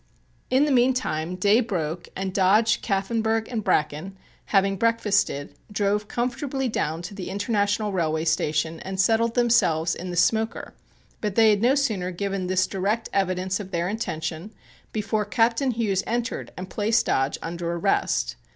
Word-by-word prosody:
In 265 +3 +4
the 300 - 0
meantime 240 - +1
day 205 +5 +4
broke 175 -7 -3
and 190 0 -3
Dodge, 210 +4 +3
Kaffenburgh 220 +2 0
and 225 -4 -3
Bracken, 155 +6 0 0.3
having 195 -1 +2
breakfasted, 205 -8 +1 0.2
drove 205 0 0
comfortably 260 +3 -2
down 165 -7 -2
to 180 - -7
the 195 -3 -6
International 205 +1 0
Railway 160 -3 0
Station 160 0 0
and 190 0 -6
settled 225 +4 +2
themselves 200 -10 +3
in 180 +2 -6
the 175 - -4
smoker, 220 +5 +1 0.5
but 210 -3 -2
they 225 -1 +6
had 205 -1 +1
no 250 +4 +4
sooner 215 -11 0
given 195 0 -3
this 185 0 +2
direct 205 +4 -2
evidence 185 0 0
of 195 -2 -7
their 170 -2 -1
intention 170 -3 -4 0.4
before 215 0 -1
Captain 230 +6 +1
Hughes 215 -5 0
entered 235 0 -2
and 185 +1 -5
placed 215 +4 +1
Dodge 135 +1 +1
under 170 0 -3
arrest. - - 0
200 Hz, 150 wpm, -24 LUFS, 180-225 Hz, 0.5 s, they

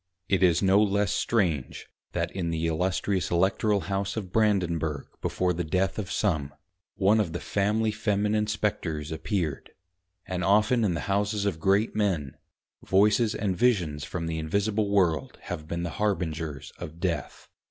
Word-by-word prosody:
It 95 -2 +2
is 90 -1 +4
no 95 +2 +5
less 100 0 +2
strange 85 - 0 0.3
that - - -1
in 90 -3 -3
the 80 0 -1
Illustrious 90 +2 0
Electoral 95 +3 +2
House 100 +2 -2
of 95 -5 -5
Brandenburg 85 -9 +1 0.2
before 90 -1 0
the 90 +1 -2
Death 90 +4 0
of 95 -4 -4
some 80 -8 0 0.4
one 100 +3 +3
of 90 -7 0
the 85 - -3
Family 105 +2 0
Feminine 105 0 0
Spectres 100 -8 -2
appeared: 80 -2 -2 0.6
and 90 -1 -3
often 110 +5 +3
in 95 -5 +1
the - - -3
Houses 100 +1 0
of 95 -6 -1
Great 100 +5 +2
men, 90 -10 0 0.5
Voices 105 +3 +3
and 100 -3 -1
Visions 90 -10 +1
from 85 +3 -4
the 80 0 -2
Invisible 100 +6 0
World 90 -6 +1
have 75 0 -6
been 85 +1 -3
the 85 - -3
Harbingers 80 -8 -2
of 80 +2 -8
Death. 85 -6 -3
95 Hz, 155 wpm, -27 LUFS, 80-105 Hz, 0.6 s, no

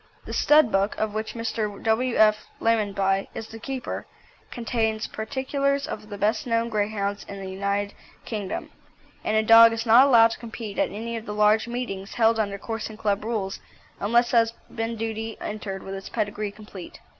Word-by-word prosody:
The - - -6
Stud 300 -6 +5
Book, 195 +2 +1
of 215 -1 -1
which 220 +2 -4
Mr. 220 -3 -3
W. 230 +2 +1
F. 215 0 +4
Lamonby 200 -3 +1
is 225 - -5
the 225 - -9
keeper, 265 +1 -5 0.4
contains 225 -2 -1
particulars 275 +5 -1
of - - -5
all 210 - -16
the 205 -1 -7
best 220 +6 0
known 230 0 +1
Greyhounds 205 -1 -1
in 200 - -7
the 190 - -6
United 200 +1 -1 0.3
Kingdom, 205 -4 -4 0.5
and 215 - +1
a 220 - +3
dog 230 +1 +8
is 225 +1 -3
not 240 +4 +7
allowed 230 -4 +6
to - - -6
compete 225 -3 -7
at - - +2
any 230 +3 -5
of 225 - -8
the 210 - -4
large 210 +2 +4
meetings 235 -5 -5
held 225 -1 +3
under 200 -2 -1
Coursing 225 0 -5
Club 205 -2 0
rules 210 -4 -3 0.4
unless 235 +4 +2
it - - +5
has 230 0 +3 0.2
been 225 0 -2
duly 225 0 -4
entered 205 -2 -5
with 195 - -6
its 195 0 -7
pedigree 210 0 -2
complete. 205 -3 -11
220 Hz, 185 wpm, -25 LUFS, 205-230 Hz, 0.5 s, dog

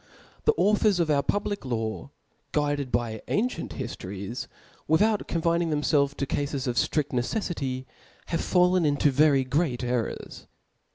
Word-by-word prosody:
^ - - -40
The 450 - +5
authors 210 -1 +3
pf 165 -3 +2
our 140 -1 +3
public 205 +4 -1
law, 115 -1 -3 0.4
guided 145 -2 0
l>y 115 -2 -1
an 230 +5 +1
cieat - - -6
hiiM^es, 100 -3 -5 0.4
without 205 +7 +3
confining 170 0 +1
themfelves 145 -2 +1
19 140 - +1
cafes 140 -1 -2
of 125 -2 -1
ftrid 150 +3 +1
neceflity^ 130 - -2 0.4
have 165 - 0
fallen 180 0 +3
into 145 -1 +3
very 140 0 +4
great 130 -1 0
errors. 120 -2 -3
145 Hz, 145 wpm, -27 LUFS, 130-170 Hz, 0.4 s, The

